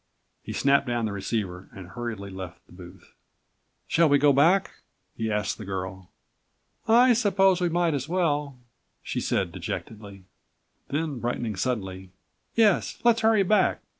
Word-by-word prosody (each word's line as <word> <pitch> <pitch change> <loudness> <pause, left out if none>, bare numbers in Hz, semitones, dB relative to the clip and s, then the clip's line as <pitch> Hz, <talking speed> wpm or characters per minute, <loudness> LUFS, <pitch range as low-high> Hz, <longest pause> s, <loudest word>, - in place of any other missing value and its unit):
He - - -8
snapped 140 0 +2
down 120 -1 -1
the106 105 - -3
receiver 100 -3 -4
and 95 -2 -10
hurriedly 110 -3 -6
left 95 -2 -9
the - - -25
booth. 90 +1 -14 0.7
"Shall 165 -1 +3
we 145 - +5
go 145 0 +4
back?" 170 +8 +3 0.4
he 110 -1 -2
asked 105 +1 -2
the - - -6
girl. 95 -1 -6 0.8
"I 240 +3 +6
suppose 195 -5 +3
we 175 - +2
might 170 -1 +1
as 140 +1 -3
well," 150 -6 0 0.5
she - - -3
said - - -1
dejectedly. 100 -3 -7 0.6
Then 145 -2 -3
brightening 120 -2 -3
suddenly, 95 -4 -3 0.5
"Yes, 215 -5 +2
let's 235 -1 +4
hurry 220 -2 +4
back. 210 +3 +2
125 Hz, 145 wpm, -26 LUFS, -, 0.8 s, I